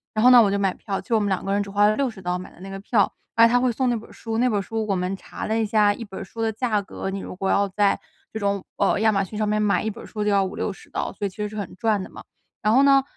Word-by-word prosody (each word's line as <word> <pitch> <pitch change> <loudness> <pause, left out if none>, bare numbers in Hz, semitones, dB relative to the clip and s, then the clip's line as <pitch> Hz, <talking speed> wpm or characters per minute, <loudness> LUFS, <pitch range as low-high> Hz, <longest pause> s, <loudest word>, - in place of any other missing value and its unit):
然 215 - +1
后 250 - +8
呢， 245 -1 +9
我 210 - +4
就 200 - 0
买 195 -2 +1
票， 195 -2 -4
就 230 - -1
我 - - +4
们 205 -1 0
两 190 - -1
个 195 - 0
人 205 - +2
只 200 - -5
花 205 +1 +4
了 215 - +2
60 250 -6 -2
刀 180 0 -1
买 180 - -9
的 - - -19
那 195 - -8
个 195 0 -6
票， 205 0 +2 0.2
而 230 0 +7
且 - - -1
他 245 - +4
会 250 -1 +2
送 255 +2 0
那 240 - +1
本 225 - -8
儿 - - -15
书。 225 -1 -4
那 250 - +3
本 215 - +1
儿 - - -1
书 220 +2 -3
我 200 - +1
们 180 +1 -1
查 - - -8
了 220 - 0
一 225 - +2
下， 210 -1 +3
一 230 - -7
本 195 -3 -8
儿 - - -5
书 225 +4 -8
的 225 - +1
价 220 -1 0
格 195 0 -6
你 195 - -4
如 - - -7
果 195 +1 -2
要 200 0 +3
在 200 +1 +2 0.3
这 220 - -5
种 200 -2 -1
呃， 200 0 +2
亚 220 0 +4
马 195 -1 +1
逊 210 +2 -7
上 215 0 0
面 210 0 +1
买， 205 -1 +2
一 220 - -1
本 215 - -8
儿 - - -10
书 210 -2 -4
就 210 - +1
要 200 -1 +3
50-60 195 +1 -4
刀， - - -3
所 205 - -4
以 - - 0
其 185 - -20
实 210 -1 -2
是 215 - -10
很 200 -3 -5
赚 215 -2 0
的 - - -9
嘛。 - - -11 0.4
然 210 - +2
后 265 +3 +6
呢， 275 -1 +5
210 Hz, 370 characters per minute, -23 LUFS, 195-225 Hz, 0.4 s, 呢